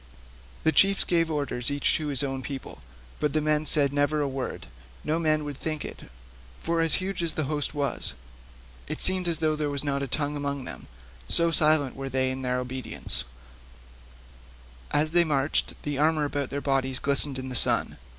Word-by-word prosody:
The 160 - +3
chiefs 195 +4 +4
gave 165 -2 +1
orders 145 -4 -1
each 145 0 +1
to 155 - -4
his 140 -2 +1
own 135 -1 -3
people, 135 0 -8 0.4
but 150 - 0
the 155 - +2
men 155 0 0
said 140 -2 +2
never 145 +1 +1
a 145 - 0
word; 135 -1 -5 0.4
no 155 +2 0
man 155 -2 +1
would 145 -2 -6
think 155 -1 -4
it, - - -9 0.5
for 165 0 0
huge 185 +3 +2
as 170 -2 0
the 155 - -1
host 145 +1 0
was, 140 - -2 0.7
it - - -5
seemed 185 -1 +4
as 170 -2 +1
though 155 -1 0
there 150 -1 -2
was 140 0 0
not 140 -1 -1
a 140 - -2
tongue 145 +3 -1
among 140 -1 -3
them, - - -8 0.4
so 170 0 +4
silent 150 -4 +3
were 135 0 -5
they 130 0 0
in 130 0 -5
their 125 -1 -1
obedience; 125 -1 -1 1.6
and 145 - +3
as 155 - -1
they 175 0 +5
marched 145 -2 0
the 145 -2 -3
armour 155 0 +2
about 145 -2 -3
their 140 - -4
bodies 135 -2 0
glistened 140 0 +1
in 130 0 -6
the - - -6
sun. - - +3
145 Hz, 190 wpm, -26 LUFS, 135-155 Hz, 1.6 s, they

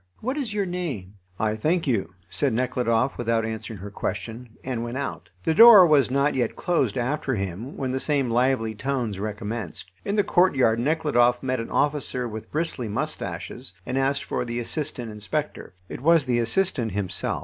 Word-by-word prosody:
What 255 +5 -2
is 275 -7 -2
your 205 -1 0
name?" 160 - -4 0.3
"I 110 -1 +1
thank 160 +10 0
you," 95 - -1
said 140 -5 0
Nekhludoff, 125 0 0
without 115 -1 +1
answering 110 0 -5
her 100 +2 -8
question, 115 +5 -5
and 125 -3 -3
went 120 +2 -4
out. 140 - -5
The 160 - +2
door 220 0 +10
was 145 -6 +4
not 140 +3 +2
yet 125 -2 -1
closed 140 - 0
after 130 +2 -1
him 100 - -5
when 130 -2 -2
the 130 - -1
same 140 -2 +1
lively 120 -2 +1
tones 120 -4 -2
recommenced. 105 -2 -5
In 200 - -1
the 205 - +3
courtyard 135 -13 +3
Nekhludoff 125 -4 +2
met 130 -1 -1
an 115 - -5
officer 145 -4 0
with 110 -1 -8
bristly 155 -6 -2
moustaches, 100 -3 -5
and 125 - -3
asked 135 +1 +1
for - - -2
the 120 -1 -4
assistant 120 -2 -3
inspector. 105 +2 -4
It - - -8
was 165 0 +4
the 120 -2 +1
assistant 120 - +1
himself. 95 -2 -1
125 Hz, 175 wpm, -25 LUFS, 110-150 Hz, 0.3 s, door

